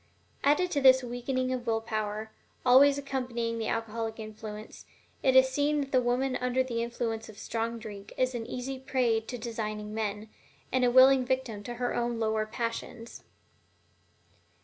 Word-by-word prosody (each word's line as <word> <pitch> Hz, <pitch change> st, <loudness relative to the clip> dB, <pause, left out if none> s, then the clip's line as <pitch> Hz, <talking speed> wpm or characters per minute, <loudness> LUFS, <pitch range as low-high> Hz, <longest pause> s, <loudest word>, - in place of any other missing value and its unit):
Added 300 Hz, +6 st, +3 dB
to 285 Hz, -, 0 dB
this 260 Hz, -1 st, +7 dB
the 250 Hz, -, -7 dB
weakening 255 Hz, +1 st, -2 dB
of 245 Hz, -1 st, -4 dB
will 225 Hz, -1 st, +2 dB
power 215 Hz, -1 st, -3 dB, 0.3 s
always 275 Hz, +3 st, +7 dB
accompanying 250 Hz, -4 st, -3 dB
the 220 Hz, -, -2 dB
alcoholic 225 Hz, 0 st, -3 dB
influence, 215 Hz, 0 st, -9 dB, 0.3 s
it 260 Hz, -1 st, +3 dB
is 260 Hz, 0 st, +8 dB
seen 290 Hz, +3 st, +1 dB
that 275 Hz, -1 st, -5 dB
the 255 Hz, -, +4 dB
woman 250 Hz, +2 st, 0 dB
under 250 Hz, +1 st, +1 dB
the 235 Hz, -3 st, -3 dB
influence 230 Hz, -1 st, -3 dB
of 210 Hz, -, -12 dB
strong 230 Hz, +1 st, -3 dB
drink 205 Hz, -3 st, -9 dB
is 255 Hz, 0 st, +1 dB
an 230 Hz, -2 st, -4 dB
easy 260 Hz, +2 st, -5 dB
prey 255 Hz, -4 st, +1 dB
to 225 Hz, +3 st, -7 dB
designing 215 Hz, -2 st, -4 dB
men, 215 Hz, -1 st, -3 dB, 0.4 s
and 255 Hz, -1 st, +2 dB
a 245 Hz, -, +5 dB
willing 260 Hz, +1 st, +7 dB
victim 250 Hz, -5 st, -2 dB
to 240 Hz, -, -5 dB
her 245 Hz, 0 st, -1 dB
own 240 Hz, -1 st, -1 dB
lower 220 Hz, -1 st, 0 dB
passions. 230 Hz, +1 st, -5 dB
240 Hz, 170 wpm, -29 LUFS, 225-260 Hz, 0.4 s, is